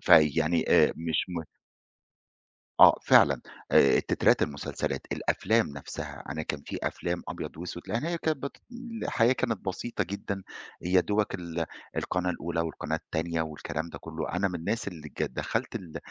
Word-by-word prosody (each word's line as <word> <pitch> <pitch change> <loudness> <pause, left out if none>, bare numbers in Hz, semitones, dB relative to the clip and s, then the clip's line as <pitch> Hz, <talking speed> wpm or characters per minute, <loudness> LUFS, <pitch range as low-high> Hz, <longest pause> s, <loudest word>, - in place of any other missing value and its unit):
فيعني 80 0 +5
آآ - - +6
مش 80 -1 0
م 85 -2 -3 1.4
آه، - - +9
فعلًا - - +6 0.3
آآ 70 - +6
تترات - - +3
المسلسلات، 70 0 -2
الأفلام 110 +3 +2
نَفْسها. 70 -1 -7
أنا 80 +1 -3
كان 75 -2 -3
فيه - - -4
أفلام 85 0 -2
أبيض - - -5
وأسود، 85 +1 -6
لإن 115 +8 -1
هي 170 +1 -1
كانت 160 -1 0
بت 140 +1 -5 0.5
الحياة 115 +1 +3
كانت 120 -4 -1
بسيطة 100 +2 -2
جدًا، 100 +1 -4 0.4
يا 90 +2 +4
دوبك 105 +3 0
ال 85 -2 -3 0.3
القناة 90 0 0
الأولى 85 -1 -2
والقناة 80 -1 -2
التانية 80 0 -2
والكلام 80 +1 -4
ده - - -8
كُلّه. 80 -1 -5
أنا 95 +3 +1
من 90 - -6
الناس 100 +7 -2
اللي 80 -5 -9
ك - - -5
دخَّلت - - -2
ال 85 -4 -6
85 Hz, 155 wpm, -29 LUFS, 80-100 Hz, 1.4 s, آه